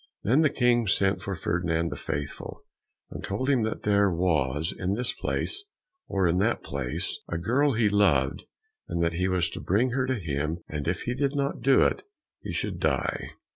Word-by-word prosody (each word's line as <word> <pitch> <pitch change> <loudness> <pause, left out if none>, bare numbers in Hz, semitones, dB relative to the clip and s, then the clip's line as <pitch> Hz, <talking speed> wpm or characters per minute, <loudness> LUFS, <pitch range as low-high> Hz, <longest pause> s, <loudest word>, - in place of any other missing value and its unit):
Then 130 +9 +4
the 155 - +4
King 120 -4 +2
sent 95 +1 +2
for 95 - -3
Ferdinand 85 -1 0
the - - -3
Faithful, 70 0 -5 0.5
and - - -7
told 130 +8 -1
him 130 -4 +3
that 110 0 -2
there 100 -1 +4
was, 80 -4 0
in 95 +2 -1
this 125 +2 -1
place 405 - -2 0.4
or 95 -1 +1
in 85 +2 +2
that 110 +4 +1
place, 70 -3 -3
a 85 - -1
girl 130 - +2
he 110 -1 +3
loved, 75 -10 +2 0.4
and 85 - -1
that 85 0 +1
he 90 +2 0
was 90 -2 +2
to - - -6
bring 115 +7 +2
her 130 +1 0
to 130 - +1
him, 80 - -3
and 75 -1 -4
if 85 0 -1
he 120 - -1
did 140 +2 0
not 140 0 -1
do 135 -1 +5
it - - +1 0.4
he - - -5
should - - -3
die. - - 0
95 Hz, 195 wpm, -27 LUFS, 85-120 Hz, 0.5 s, do